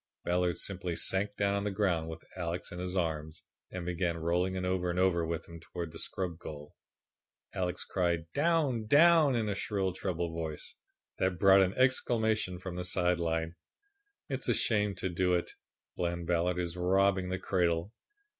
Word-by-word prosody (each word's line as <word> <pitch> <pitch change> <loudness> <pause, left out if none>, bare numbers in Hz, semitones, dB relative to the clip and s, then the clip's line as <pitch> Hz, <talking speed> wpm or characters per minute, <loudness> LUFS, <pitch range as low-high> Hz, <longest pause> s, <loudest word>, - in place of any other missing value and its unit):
Ballard 90 0 +1
simply 90 -3 -3
sank 100 +4 -1
down 100 -1 +2
on 100 0 0
the 105 - 0
ground 95 -5 0
with 80 0 -8
Alex 85 -1 -4
in 90 - -6
his 90 +1 -3
arms 80 -2 -2 0.3
and 90 -1 -6
began 85 -1 -1
rolling 90 +3 0
over 90 -1 0
and 85 - -2
over 90 -2 +3
with 80 0 -3
him 85 0 -10
towards 85 0 -6
the 80 - -7
scrub 90 -3 -3
goal. 75 -2 -9 0.8
Alex 90 -2 -2
cried 85 -3 0
"Down! 145 -8 +1
Down!" 155 0 +6
in 115 -2 0
a 105 - 0
shrill, 95 -2 -1
treble 85 -3 -3
voice 80 -2 -5 0.5
that 95 -1 +1
brought 95 +1 +7
an 95 0 +1
exclamation 110 -7 +1
from 90 0 -6
the 90 - -2
side 90 -1 +1
line. 80 0 -1 0.7
"It's 135 -2 -3
a 120 - +4
shame 105 -5 +1
to 95 - -2
do 90 +1 +2
it. 85 - -2 0.4
Bland 85 -1 -2
Ballard 90 +1 +1
is 85 -2 -2
robbing 95 +1 +2
the 95 - -1
cradle." 90 0 0
90 Hz, 175 wpm, -31 LUFS, 85-100 Hz, 0.8 s, brought